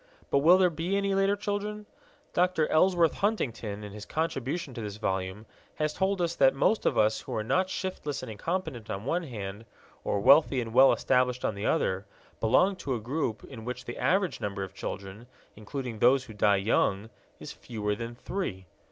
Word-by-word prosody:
But 140 - +4
will 170 +6 +7
there 185 -2 +4
be 170 +5 -1
any 200 0 0
later 195 +1 +3
children? 210 0 -3 0.5
Dr. 180 -3 +2
Ellsworth 170 0 +4
Huntington 120 - -2
in 105 - -7
his 105 0 -9
contribution 155 -2 -2
to 115 - -6
this 105 -1 -6
volume 95 0 -3 0.3
has 155 0 -1
told 190 -1 0
us 170 -1 0
that 135 -1 +5
most 210 +10 +2
of - - +1
us 110 +1 +3
who - - -6
are 110 - -1
not 185 - +1
shiftless 150 -8 -4
and 120 - -6
incompetent, 150 - -4
on 100 +3 -4
one 170 +6 0
hand, 105 - -6 0.4
or 100 - 0
wealthy 135 +4 +5
and 115 -2 -4
well 130 +2 +7
established, 125 0 +1
on - - 0
the 100 +1 -3
other, 95 +1 0 0.3
belong 185 - +3
to 135 -7 -2
a - - -3
group 120 -1 -3
in 115 -5 -10
which 125 +2 -5
the 120 - -6
average 190 -1 +1
number 100 -1 -3
of 95 0 -8
children, 100 +5 -7 0.3
including 115 +1 -6
those 130 +3 +5
who 115 - -11
die 105 -1 +3
young, 100 +1 +1 0.3
is - - -8
fewer 105 -3 -3
than 115 +2 -6
three. 120 - -4
130 Hz, 190 wpm, -28 LUFS, 105-175 Hz, 0.5 s, will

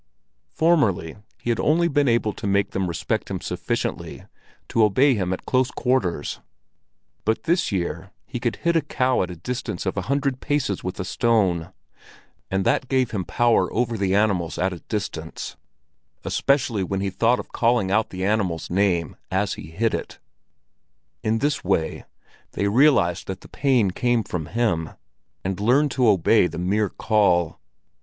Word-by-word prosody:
Formerly 145 - +2 0.2
he 120 - -1
had 115 - -1
only 170 +3 +3
been 145 -3 +2
able 115 -3 +2
to 100 - -5
make 100 0 +1
them 95 -1 -1
respect 85 -2 -2
him - - -3
sufficiently - - -3 0.4
to 115 - +3
obey 130 +7 +4
him 95 -5 -1
at 95 - -4
close 130 0 +2
quarters; 95 - -1 0.8
but 110 +1 0
this 170 -3 +1
year 85 -1 -3 0.2
he 120 - -5
could 120 -3 -1
hit 170 +7 0
a 165 - +4
cow 130 -3 +1
at 90 - -2
a 90 - -6
distance 90 0 -4
of 95 - -1
a 100 - -1
hundred 140 -2 0
paces 140 -10 -1
with 90 +1 -5
a 95 - -2
stone, 95 -7 +1 0.8
and 95 0 0
that 130 - +1
gave 130 -3 +1
him 100 -4 -2
power 120 +5 +2
over 120 0 0
the 100 -2 0
animals 100 -6 +1
at 95 +1 0
a 85 - -8
distance, 85 -6 -4 0.7
especially 120 -7 +1
when 95 +1 -2
he 100 0 -1
thought 115 +6 +2
of - - -8
calling 115 -5 +2
out 110 +2 +2
the 95 0 -4
animal's 95 -7 -1
name 90 -3 +1
as 95 +1 0
he - - -9
hit 110 +7 0
it. - - -4 1.0
In 110 +1 +1
this 145 +5 0
way 90 -4 -1 0.5
they 100 - 0
realized 100 - +3
that 95 0 -5
the - - -14
pain 125 -9 +2
came 120 +2 +1
from 85 -5 -4
him, 90 -9 0 0.5
and 95 0 -3
learned 130 +7 +3
to 125 -2 +2
obey 100 0 +4
the 85 - -8
mere 100 +4 +1
call. 95 -7 +1
105 Hz, 170 wpm, -23 LUFS, 95-125 Hz, 1.0 s, obey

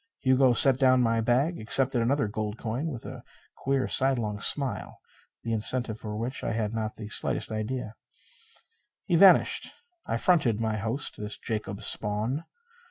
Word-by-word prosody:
Hugo 130 -1 +3
set 130 +2 +5
down 130 -2 +4
my 115 -1 +1
bag, 130 +9 0
accepted 125 +3 +3
another 130 +1 +1
gold 105 +1 -4
coin; 120 +6 -4
and 165 - -3
with 120 -5 -8
a - - -9 0.3
queer 135 -1 -1
sidelong 120 -6 0
smile, 130 -3 -2 0.4
the 115 - -3
incentive 110 +1 0
for 105 -1 -6
which 120 +4 -5
I 115 - -2
had 110 -1 -2
not 110 -1 -3
the 110 - -8
slightest 105 - 0
idea, 110 +1 -4 1.1
he 175 - +1
vanished. 185 +2 +5 0.4
I - - -1
fronted 140 - +2
my 110 -1 -1
host, 115 +7 -2
this 105 0 -5
Jacob 105 -3 -5
Spawn. 110 +9 -2
115 Hz, 160 wpm, -27 LUFS, 110-130 Hz, 1.1 s, set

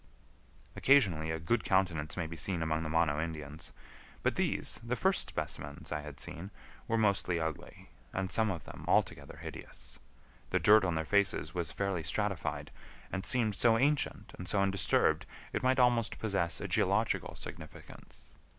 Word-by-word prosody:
Occasionally 95 - +4
a 80 - -1
good 100 +10 0
countenance 90 -6 +1
may 85 - -1
be 80 +1 -6
seen 85 0 -2
among 80 0 0
the 80 - -3
Mono 80 -2 +2
Indians, 80 -2 -6 0.5
but - - +2
these, - - -1
the 120 +1 -1
first 190 +7 +1
specimens 70 -2 -5
I 75 -1 -1
had 75 -2 -9
seen, 90 +8 -6 0.4
were 115 - +1
mostly 100 -5 +2
ugly, 80 -5 -5 0.2
and 95 0 -2
some 110 -1 +2
of 85 -8 -3
them - - -9
altogether - - +1
hideous. - - -10 0.5
The - - +2
dirt 105 0 +6
on 90 -3 0
their 80 0 -1
faces 95 -4 +1
was 85 -5 -2
fairly 100 -4 -1
stratified, 100 +2 -2 0.4
and 95 - -2
seemed 115 -2 +2
so 115 +3 +4
ancient 145 +4 0
and 90 - -6
so 100 - +1
undisturbed 100 -1 +2 0.3
it - - 0
might 130 0 +3
almost 120 -3 +3
possess 100 -6 0
a - - -4
geological - - +1
significance. 80 -1 -11
90 Hz, 160 wpm, -32 LUFS, 80-105 Hz, 0.5 s, dirt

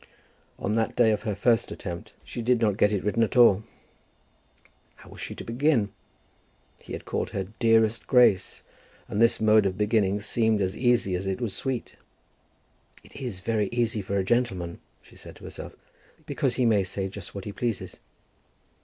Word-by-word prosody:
On 105 - -2
that 110 0 0
day 115 -2 +4
of 105 - 0
her 105 - -1
first 115 +2 +2
attempt 85 -2 -7
she 120 - -6
did 120 +1 +2
not 105 -4 +2
get 105 +1 +3
it 100 -3 -1
written 105 +3 0
at 115 +3 +1
all. 110 -4 +6 1.3
How - - -16
was - - -11
she - - -6
to - - -8
begin? 120 -3 +1 0.9
He - - -10
had - - -6
called - - -2
her 95 - -3 0.2
"Dearest 115 -1 +3
Grace;" 120 -7 +3 0.4
and 105 - -2
this 115 - +4
mode 110 -2 +5
of 95 -1 -3
beginning 105 -1 +2
seemed 110 +1 +1
as 95 0 -1
easy 120 -6 +2
as 90 +2 -2
it 95 +2 -2
was 115 -6 -3
sweet. 130 -3 -4 1.1
"It - - -18
is 120 -9 -5
very 105 0 0
easy 115 -3 0
for 100 +1 -2
a 95 - +1
gentleman," 95 -7 -1 0.2
she - - -19
said - - -12
to - - -16
herself, - - -8 0.5
"because - - -1
he 125 - +1
may 105 -4 +4
say 95 +1 -3
just 95 -1 -9
what 100 - -6
he 105 - -4
pleases." 115 +1 -4
110 Hz, 180 wpm, -26 LUFS, 100-115 Hz, 1.3 s, all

